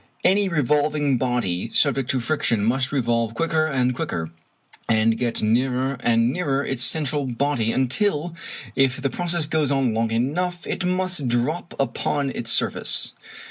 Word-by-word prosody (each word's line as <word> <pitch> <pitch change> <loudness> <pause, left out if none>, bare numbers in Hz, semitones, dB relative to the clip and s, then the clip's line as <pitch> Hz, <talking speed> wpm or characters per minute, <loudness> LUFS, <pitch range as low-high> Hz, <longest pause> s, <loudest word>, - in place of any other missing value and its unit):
Any 195 +1 +3
revolving 145 -2 +1
body 115 -6 -1
subject 135 -3 +2
to 130 - +1
friction 120 -5 0
must 130 +3 +1
revolve 115 -4 0
quicker 160 +2 +1
and 130 -4 +1
quicker, 80 -8 -4 0.6
and 110 0 +3
get 115 -1 -2
nearer 130 +4 +1
and 115 +1 +2
nearer 140 -5 -1
its 135 -3 -2
central 145 0 +2
body, 125 -2 0
until, 155 - 0 0.4
if 135 -1 +2
the 135 0 -1
process 175 +1 0
goes 155 -2 0
on 135 -4 +1
long 115 0 0
enough, 165 +10 -1
it 195 - -3
must 180 -5 0
drop 125 +9 -1
upon 135 +2 -1
its 115 -3 -3
surface. - - 0
135 Hz, 145 wpm, -23 LUFS, 120-155 Hz, 0.6 s, Any